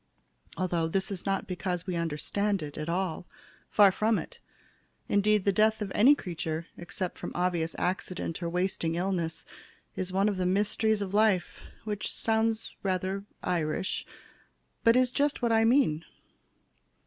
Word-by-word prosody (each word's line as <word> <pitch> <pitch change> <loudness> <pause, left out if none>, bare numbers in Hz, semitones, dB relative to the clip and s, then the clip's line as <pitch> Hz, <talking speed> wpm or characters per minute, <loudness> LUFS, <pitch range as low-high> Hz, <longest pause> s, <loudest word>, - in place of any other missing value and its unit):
Although 175 -3 0
this 190 +5 -1
is 195 0 -5
not 195 0 0
because 180 -1 -3
we 185 -2 -2
understand 170 +4 -1
it 145 -1 -7
at 155 +1 -4
all. 180 0 -2 0.4
Far 205 -2 +6
from 215 +3 +2
it. - - -7 0.7
Indeed 210 0 +3
the 200 - +4
death 215 +2 +3
of 205 -3 -4
any 260 +8 +6
creature, 165 - -4
except 175 +1 -5
from - - -5
obvious 175 -2 0
accident 180 -1 -2
or 170 - -1
wasting 175 -2 -1
illness, 175 -2 -2 0.5
is 185 0 -3
one 195 +2 +2
of 205 -2 0
the 180 -1 0
mysteries 205 +2 +1
of 195 -1 -6
life. 210 -4 +2 0.2
Which 210 -2 -3
sounds 225 0 0
rather 190 +1 -1 0.2
Irish, 170 +1 -1 0.8
but 230 0 +6
is 255 -1 +3
just 285 -1 0
what 235 - +3
I 225 0 +4
mean. 225 - +3
190 Hz, 150 wpm, -29 LUFS, 175-215 Hz, 0.8 s, Far